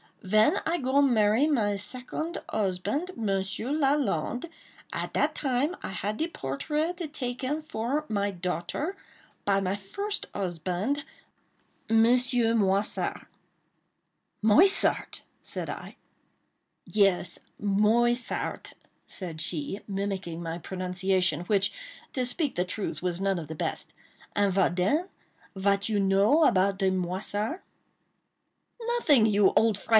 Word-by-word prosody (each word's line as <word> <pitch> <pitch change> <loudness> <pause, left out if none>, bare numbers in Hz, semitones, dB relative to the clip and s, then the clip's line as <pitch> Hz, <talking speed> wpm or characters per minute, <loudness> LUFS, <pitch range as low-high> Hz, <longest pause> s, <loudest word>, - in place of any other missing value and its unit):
Ven 215 +3 +4
I 335 +2 +1
go 270 -1 +2
marry 230 0 +4
my 220 -9 +2
segonde 255 - -2 0.2
usbande, 220 - -1
Monsieur 195 +2 -1
Lalande, 275 - +1 0.5
at - - -4
dat - - +2
time 280 +5 0
I - - -5
had 205 +2 -3
de 320 - 0
portraite 310 - -3
take 250 -3 -4 0.2
for 290 +1 -2
my 205 -2 0
daughter 180 - -3 0.5
by 195 -1 +3
my 195 0 -1
first 400 - -4
usbande, 185 - -2 0.9
Monsieur 235 +1 +4
Moissart!" 200 -2 0 1.2
"Moissart!" 340 - +5 0.2
said - - -4
I. - - -9 0.9
"Yes, 195 -4 +2 0.2
Moissart," 225 +5 +1 0.3
said 165 -5 -6
she, 170 +4 -3
mimicking 195 -4 -3
my 165 0 -4
pronunciation, 185 0 0
which, 195 +2 +1 0.4
to 255 -2 0
speak 260 +2 0
the 180 - 0
truth, 180 -4 -4
was 180 -1 -2
none 195 -2 +1
of 160 - -7
the 160 - -6
best,—"and 200 +5 -3
vat 185 -2 +2
den? 290 - +1 0.5
Vat 200 +2 +1
you 210 -2 +1
know 200 +10 +4
about 195 -4 +3
de 190 -1 +2
Moissart?" 195 - -2 1.2
"Nothing, 455 - +3
you 205 -2 +4
old 220 -3 +3
fright! 240 - -13
205 Hz, 115 wpm, -28 LUFS, 190-260 Hz, 1.2 s, Moissart